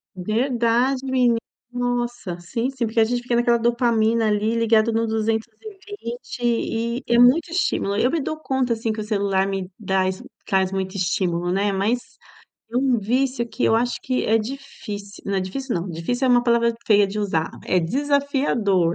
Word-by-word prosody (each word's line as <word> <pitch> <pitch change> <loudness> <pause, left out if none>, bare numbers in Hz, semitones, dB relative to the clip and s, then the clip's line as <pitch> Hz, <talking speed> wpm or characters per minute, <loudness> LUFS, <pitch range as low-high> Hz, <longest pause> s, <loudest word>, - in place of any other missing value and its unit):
Verdade, 235 +5 +1
meni 250 -3 +2 0.3
nossa, 240 -6 -2
sim, 230 +9 -2
sim, 265 -3 -2
porque 225 +1 -1
a - - +7
gente 240 +2 -1
fica 245 -1 0
naquela 240 0 +3
dopamina 230 -1 +2
ali, 210 +1 +1
ligada 230 -1 +3
no 225 0 0
220 235 - -4
e 235 0 -1
é 235 - +3
muito 255 +8 +5
estímulo. 330 - 0
Eu 250 +4 +2
me 330 - 0
dou 310 +3 -3
conta 265 -5 0
assim 225 0 -2
que 215 - -4
o - - -3
celular 200 -2 0
me 195 -1 -4
dras 190 -1 0 0.2
traz 190 -2 +1
muito 190 0 -3
estímulo, 180 -2 0
né. 200 +2 +1
Mas 205 +6 +1 0.7
é - - -1
um 260 -2 +2
vício 250 +3 0
que 245 - -3
eu 225 - +4
acho 240 +1 0
que 255 -1 -1
é 225 +1 +3
difíci 215 -4 -7
não, 200 -1 0
difícil 245 +8 -4
não, 175 +2 -3
difícil 245 +11 -1
é - - +3
uma 245 -1 +5
palavra 235 -1 +3
feia 205 -2 +5
de 205 +2 -5
usar. 165 -6 -1 0.2
É 185 - +3
desafiador, 245 - +1
230 Hz, 175 wpm, -22 LUFS, 200-245 Hz, 0.7 s, a